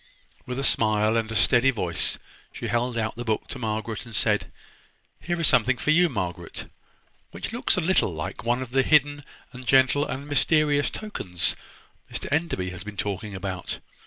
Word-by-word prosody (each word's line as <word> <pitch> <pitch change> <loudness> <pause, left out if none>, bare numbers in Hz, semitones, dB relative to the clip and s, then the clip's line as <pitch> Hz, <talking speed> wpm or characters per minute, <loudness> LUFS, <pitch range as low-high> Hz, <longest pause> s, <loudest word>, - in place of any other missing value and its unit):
With 125 0 -4
a 135 - -2
smile 110 -3 +3
and 115 -1 0
a - - -4
steady 120 +5 +4
voice 90 -10 0 0.3
she - - -7
held 120 0 0
out 110 -1 -1
the 120 - -5
book 110 -2 -1
to 140 - -6
Margaret, 110 -1 -3
and 115 -3 -9
said: 105 -1 +1 0.7
"Here 175 0 -3
is 165 - +2
something 130 -2 +4
for 150 - +1
you, 175 +2 +5
Margaret, 90 - -4 0.6
which - - -6
looks 240 - +1
a - - +2
little 170 - +3
like 85 +7 -5
one 120 +2 +1
of 125 - -11
the 135 +1 +4
hidden, 145 +1 +3 0.3
and 125 0 -9
gentle, 130 +3 +4
and 140 +2 -5
mysterious 145 -1 +3
tokens 95 - -3 0.6
Mr - - -4
Enderby 145 - 0
has 95 0 -6
been 105 -1 -9
talking 100 0 -3
about. 95 -2 -4
120 Hz, 180 wpm, -25 LUFS, 105-145 Hz, 0.7 s, you